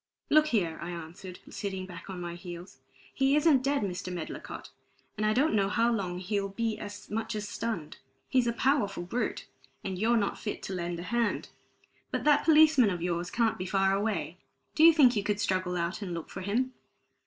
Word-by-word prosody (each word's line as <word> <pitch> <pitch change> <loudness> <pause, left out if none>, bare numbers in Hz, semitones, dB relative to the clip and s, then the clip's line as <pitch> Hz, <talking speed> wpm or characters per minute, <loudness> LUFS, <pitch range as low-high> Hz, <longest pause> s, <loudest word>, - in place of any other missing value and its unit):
"Look 305 0 +6
here," 180 - 0
I 170 - -5
answered, 175 +2 -8
sitting 190 -2 -4
back 180 0 -10
on 190 -2 -5
my 175 -1 -5
heels. 175 +1 -9 0.3
"He 270 +1 +3
isn't 300 -3 +5
dead, 275 -2 +1
Mr. 185 -1 -3
Medlicott, 175 -3 -6 0.4
and 215 - 0
I - - +3
don't 280 +7 +2
know 200 -2 +2
how 230 +3 +2
long 185 -5 -2
he'll 195 +2 -2
be 225 +2 -2
as 205 0 -8
much 225 +1 -2
as 210 0 -3
stunned. 205 -10 -4 0.3
He's 255 -2 +2
a - - +3
powerful 235 -7 +1
brute, 235 +8 -2 0.4
and 190 -2 -4
you're 230 +3 +3
not 200 -3 -1
fit 210 - -5
to 195 - -4
lend 175 -1 -3
a - - -5
hand. 235 +2 -1 0.6
But - - -2
that 295 -1 +4
policeman 305 -7 +6
of 175 -3 -3
yours 175 0 -1
can't 230 -1 +1
be 185 - -3
far 195 +1 +2
away. 195 -5 -1 0.3
Do 315 - +3
you 330 - +10
think 270 -7 +5
you 205 - +1
could 205 0 -1
struggle 185 -3 0
out 175 +5 -2
and 180 -4 -4
look 165 - -7
for 190 - -6
him?" 240 +7 0
200 Hz, 200 wpm, -29 LUFS, 180-235 Hz, 0.6 s, you